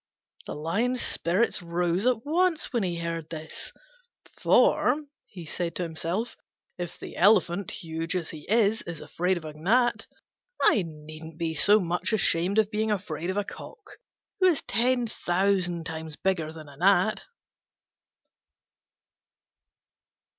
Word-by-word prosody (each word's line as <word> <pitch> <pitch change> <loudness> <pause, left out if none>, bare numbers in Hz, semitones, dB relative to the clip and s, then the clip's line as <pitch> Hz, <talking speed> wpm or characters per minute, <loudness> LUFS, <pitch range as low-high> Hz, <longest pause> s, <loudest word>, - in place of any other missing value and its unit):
The - - -5
Lion's 210 +12 0
spirits 185 +3 +1
rose 175 +4 0
at 245 -1 +1
once 330 0 +1
when 235 - +2
he 175 -3 -1
heard 165 -1 -4
this: 160 -1 -6 0.7
"For," - - +4 0.3
he 175 -5 -10
said 170 +2 -3
to 180 - -1
himself, 170 +7 -3 0.4
"if 175 -1 -5
the - - -9
Elephant, 190 -2 +3
huge 165 -2 -3
as 175 -3 -2
he 155 -2 -10
is, 220 0 +3
is 165 -3 -5
afraid 180 +2 -1
of 165 - -8
a 155 - -6
gnat, 230 +11 +1 0.5
I 210 - +5
needn't 155 +1 -10
be 165 -1 -1
so 205 +7 +5
much 175 +3 -1
ashamed 190 -1 +2
of 215 -1 +3
being 220 0 0
afraid 180 -5 -2
of 190 - -2
a 205 - +1
cock, 430 - -11 0.4
who 370 - +5
is 340 -5 +2
ten 245 +3 +2
thousand 180 -4 0
times 160 -1 -5
bigger 170 -4 -1
than 160 -2 -11
a 140 -1 -14
gnat." 195 +4 +3
180 Hz, 140 wpm, -27 LUFS, 165-215 Hz, 0.7 s, I